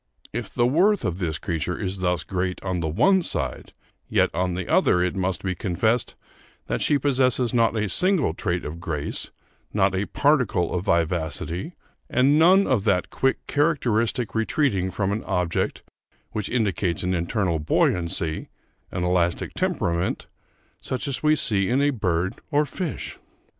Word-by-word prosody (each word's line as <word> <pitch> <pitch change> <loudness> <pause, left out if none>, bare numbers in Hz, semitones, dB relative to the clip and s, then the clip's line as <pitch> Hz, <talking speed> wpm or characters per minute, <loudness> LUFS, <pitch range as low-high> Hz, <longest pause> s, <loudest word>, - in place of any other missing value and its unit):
If - - -4
the 120 - +2
worth 180 +11 +3
of 85 +1 -2
this 80 -4 -1
creature 85 0 -3
is 95 -1 -3
thus 90 -3 0
great 90 0 -2
on 95 -2 -2
the 80 - -1
one 190 - +3
side, 65 - -3 0.4
yet - - +2
on 90 +1 -1
the 90 -1 -4
other 90 0 +3
it 90 +2 -1
must 95 -2 -1
be 95 -1 -1
confessed 110 +6 0 0.5
that - - -2
she 145 - +3
possesses 130 -3 +1
not 115 -1 +3
a 105 -1 0
single 180 - +1
trait 90 0 -2
of 80 +3 -6
grace, 75 -4 -3 0.4
not 95 -2 +2
a 95 +2 -1
particle 125 - +1
of 90 +1 -2
vivacity, 85 - -1 0.4
and 140 +4 +4
none 190 +4 +6
of 125 -7 +1
that 90 -3 +1
quick 135 0 0
characteristic 125 -7 +1
retreating 110 -4 +1
from 100 +1 -1
an 105 +2 -2
object 90 -1 -1 0.5
which 105 -2 -3
indicates 100 -7 0
an 90 +1 0
internal 85 -1 0
buoyancy, 85 +1 0 0.4
an 90 - -3
elastic 90 -1 0
temperament, 85 +1 -1 0.6
such 130 +2 -4
as 135 -3 -1
we 155 0 +4
see 100 -9 +1
in 125 +3 +2
a 145 +1 +3
bird 95 -6 -1
or 150 -1 +2
fish.... 165 +3 -5
95 Hz, 160 wpm, -24 LUFS, 90-130 Hz, 0.6 s, none